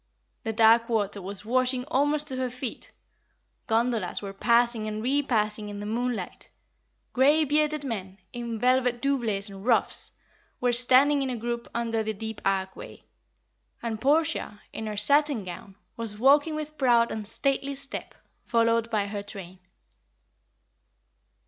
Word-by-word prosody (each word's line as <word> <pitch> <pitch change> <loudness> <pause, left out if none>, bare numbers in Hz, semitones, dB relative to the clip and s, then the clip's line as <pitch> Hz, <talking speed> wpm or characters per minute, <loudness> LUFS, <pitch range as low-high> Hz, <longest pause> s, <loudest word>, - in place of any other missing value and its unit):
The 225 - -3
dark 230 +1 +5
water 205 -3 -1
was 200 +2 -7
washing 255 +1 +1
almost 290 +1 +1
to 260 - -4
her 255 -1 -1
feet; 250 0 -6 0.8
gondolas 225 -4 +1
were 200 -1 -7
passing 235 +1 +2
and 215 0 -4
repassing 225 -6 0
in 205 0 -7
the 205 - -5
moonlight; 230 -3 -3 0.6
grey 290 +5 +4
bearded 300 +1 +1
men, 195 -7 -5 0.2
in 235 -2 -4
velvet 250 0 +2
doublets 235 -7 -1
and 195 -1 -10
ruffs, 235 0 +3 0.5
were 245 -1 +1
standing 260 +4 +4
in 270 - -1
a 250 - -3
group, 235 +1 -4
under 230 -1 0
the 220 0 -3
deep 220 +1 -6
archway; 190 -1 -3 0.8
and 225 -2 -3
Portia, 290 -7 +1
in 220 - -5
her 210 -1 -4
satin 280 +2 +3
gown, 185 +2 -9 0.2
was 225 -3 -5
walking 285 +6 +4
with 305 0 -6
proud 240 -3 +4
and 215 -2 -5
stately 275 +4 -1
step, 275 0 -5 0.3
followed 230 -1 +2
by 210 -3 0
her 205 0 -4
train. 190 -3 -9
235 Hz, 145 wpm, -27 LUFS, 210-260 Hz, 0.8 s, dark